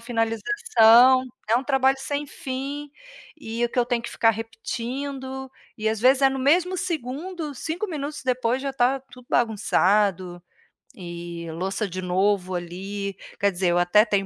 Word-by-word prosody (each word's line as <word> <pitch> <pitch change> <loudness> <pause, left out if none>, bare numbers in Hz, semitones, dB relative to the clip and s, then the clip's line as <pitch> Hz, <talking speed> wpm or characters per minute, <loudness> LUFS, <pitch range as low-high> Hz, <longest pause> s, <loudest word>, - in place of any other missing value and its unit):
finalização, 235 - +4 0.3
é 225 - +4
um 255 - 0
trabalho 270 -1 +3
sem 285 +2 -3
fim 280 +2 -5 0.5
e 235 -4 -2
que 245 - -4
eu 240 - +4
tenho 245 -1 -1
que 235 - -6
ficar 225 - +3
repetindo 260 +4 -5 0.3
e, 220 - 0
às 220 -1 -1
vezes, 260 +3 +4
é 270 - +7
no 270 - -3
mesmo 345 +7 +2
segundo, 320 0 -4
5 330 - -3
minutos 300 -4 -5
depois 255 0 0
já 275 0 -3
tá 265 +1 +2
tudo 250 -1 -14
bagunçado. 195 -5 +1 0.6
E 170 -2 -7
louça 190 +6 -2
de 185 +1 -5
novo 185 +1 +1
ali 195 +3 -5 0.2
Quer 200 0 +2
dizer, 185 0 -1
eu 175 - +2
até 175 +5 +5
tenho 200 -3 0
240 Hz, 155 wpm, -24 LUFS, 200-270 Hz, 0.6 s, é